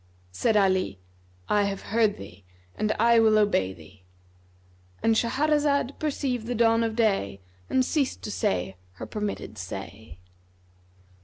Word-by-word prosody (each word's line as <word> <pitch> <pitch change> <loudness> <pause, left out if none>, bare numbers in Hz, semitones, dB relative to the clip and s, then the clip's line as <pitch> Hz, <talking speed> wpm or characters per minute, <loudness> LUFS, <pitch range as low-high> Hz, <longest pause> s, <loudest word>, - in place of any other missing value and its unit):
'" - - -33
Said 215 - +1
Ali, 190 - +2 0.5
"I 205 -1 +2
have 195 -1 -4
heard 220 -3 +3
thee 100 0 -12 0.3
and 215 0 -1
I 235 +1 +4
will 220 -1 +5
obey 205 - +2
thee."—And 90 - -7
Shahrazad 285 +3 +1
perceived 270 -6 -2
the 245 - -2
dawn 230 0 +3
of 225 -1 -2
day 195 - +1 0.3
and 260 -1 +2
ceased 280 -2 -1
to 210 - -4
say 95 - -1 0.2
her 90 - -8
permitted 205 - -5
say. 95 0 -8
205 Hz, 135 wpm, -26 LUFS, -, 0.5 s, will